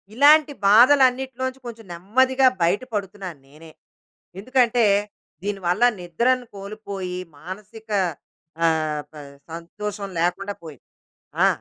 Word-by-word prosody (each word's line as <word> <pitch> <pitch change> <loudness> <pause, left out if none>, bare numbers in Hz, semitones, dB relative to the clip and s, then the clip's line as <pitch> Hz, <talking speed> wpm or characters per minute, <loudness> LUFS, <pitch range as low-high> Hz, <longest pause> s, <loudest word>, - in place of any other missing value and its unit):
ఇలాంటి 290 +3 +6
బాధలు 250 +7 +7
అన్నిటిలో 260 0 -5
నుంచి 260 0 -8
కొంచెం 230 -1 -9
నెమ్మదిగా 260 +9 +2 0.2
బయట 180 +7 +2
పడుతున్నాను 195 -5 -5
నేనే. 155 +3 -15 0.7
ఎందుకంటే, 245 +1 +2 0.6
దీని 200 0 -3
వల్ల 180 +7 +2 0.2
నిద్రను 245 +9 0
కోల్పోయి, 195 -3 -6 0.2
మానసిక 210 +7 -10 0.7
ఆహ్, 155 -2 +1
ప - - -25 0.4
సంతోషం 200 +4 -6
లేకుండా 195 +4 -1
పోయింది. 150 -6 -12 0.6
ఆ! - - +6
205 Hz, 110 wpm, -23 LUFS, 180-250 Hz, 0.7 s, బాధలు